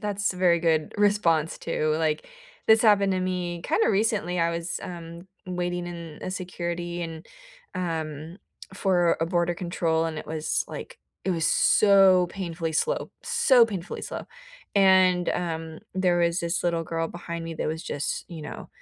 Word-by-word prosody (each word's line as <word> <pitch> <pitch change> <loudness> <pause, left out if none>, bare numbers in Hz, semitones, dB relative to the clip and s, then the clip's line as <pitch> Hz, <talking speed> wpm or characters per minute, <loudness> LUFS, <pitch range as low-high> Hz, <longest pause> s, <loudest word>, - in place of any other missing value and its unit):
that's 205 -1 -1
very 180 -2 +3
good 160 -2 +1
response 175 -7 +2
too, 155 -2 -1
like, 155 -1 -1 0.4
this 220 0 +6
happened 200 -3 +4
to 185 - 0
me 180 -2 -2
kinda 330 +8 +2
recently, 200 -4 +1
I 170 0 +2
was, 170 +1 -3
um, 170 0 -8 0.2
waiting 175 -1 -2
in 170 -3 -8
a - - -3
security 175 -2 -4
and, 165 0 -7 0.5
um 160 -1 -4 0.4
for 175 -3 +2
a 165 - +1
border 175 0 +1
control, 170 -3 0
and 160 -1 -4
it - - -8
was 155 0 -1
like - - -8 0.3
it 190 - 0
was 165 -3 +1
so 195 -3 +5
painfully 170 -3 -4
slow, 480 - 0
so 250 -4 +5
painfully 195 -5 -6
slow, - - -5 0.5
and, 185 -2 +5
um, 160 -2 -3 0.2
there 180 -2 +2
was 170 0 +2
this 170 +1 -1
little 170 -1 +1
girl 165 0 -2
behind 170 -1 -6
me 165 0 -5
that - - -2
was 160 +1 -3
just, 145 0 -3
you 165 -4 -8
know, - - -8
175 Hz, 165 wpm, -26 LUFS, 165-185 Hz, 0.5 s, this